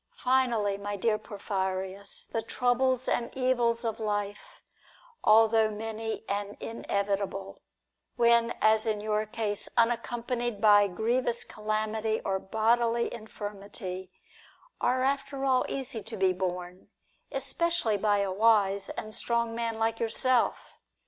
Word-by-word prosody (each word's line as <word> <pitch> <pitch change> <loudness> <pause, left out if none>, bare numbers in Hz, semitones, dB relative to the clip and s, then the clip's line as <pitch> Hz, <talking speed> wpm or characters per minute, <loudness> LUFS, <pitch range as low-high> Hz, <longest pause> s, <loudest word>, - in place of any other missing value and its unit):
Finally, 240 - +1
my 205 0 -4
dear 215 +2 +1
Porphyrins, 195 -1 -4
the 225 - -1
troubles 255 +2 +1
and 235 - 0
evils 240 -2 +1
of 225 -1 -2
life, 210 - -4 0.6
although 220 0 +5
many 220 +1 -4
and 205 0 -3
inevitable, 200 -3 -3 0.5
when, 235 -1 +4
as 220 +1 +4
in 215 -1 0
your 215 0 -1
case, 215 -2 -3
unaccompanied 240 -1 0
by 205 -1 +6
grievous 235 +5 0
calamity 215 +1 -2
or 190 -1 0
bodily 230 +3 +1
infirmity, 200 -4 -7 0.7
are 255 +1 +2
after 275 0 -1
all 260 -1 +3
easy 265 -4 -4
to 220 +2 -6
be 190 -1 +3
borne, 180 0 -4 0.4
especially 275 -2 0
by 205 0 +2
a 195 -1 -1
wise 200 -1 +3
and 215 0 -6
strong 235 0 0
man 230 -1 -2
like 225 0 0
yourself. 240 +2 0
220 Hz, 120 wpm, -29 LUFS, 205-235 Hz, 0.7 s, by